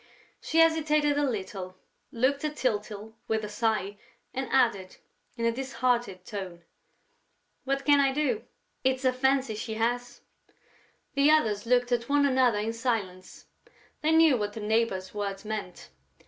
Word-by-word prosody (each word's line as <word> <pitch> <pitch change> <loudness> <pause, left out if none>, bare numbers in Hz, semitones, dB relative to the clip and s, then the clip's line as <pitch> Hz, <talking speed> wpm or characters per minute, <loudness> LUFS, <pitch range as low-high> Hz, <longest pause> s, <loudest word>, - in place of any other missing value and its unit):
She 320 - -2
hesitated 305 -3 +3
a 290 -1 +1
little, 190 -4 -5 0.3
looked 270 +3 0
at 300 0 -2
Tyltyl 215 -4 -3
with 220 -1 -1
a - - -7
sigh 210 -2 -1 0.3
and 265 +1 -3
added, 225 -8 +1 0.4
in 230 - -1
a 230 - +3
disheartened 240 -6 -1
tone: 185 -4 -7 1.0
"What 275 0 -1
can 290 -1 +5
I 275 -1 +3
do? 265 -6 -1 0.4
It's 260 0 +1
a 255 - +4
fancy 265 -1 +1
she 220 +1 -5
has...." 240 +2 -2 0.9
The 280 +1 +4
others 225 -9 +2
looked 245 0 +2
at 240 +1 0
one 285 0 +4
another 255 -5 +3
in 220 +2 -2
silence: 220 -7 -3 0.6
they 310 +1 +2
knew 320 -4 +5
what 205 -1 -3
the 220 - -7
neighbor's 210 -3 0
words 200 -1 -4
meant. 210 - -6
235 Hz, 145 wpm, -28 LUFS, 210-270 Hz, 1.0 s, can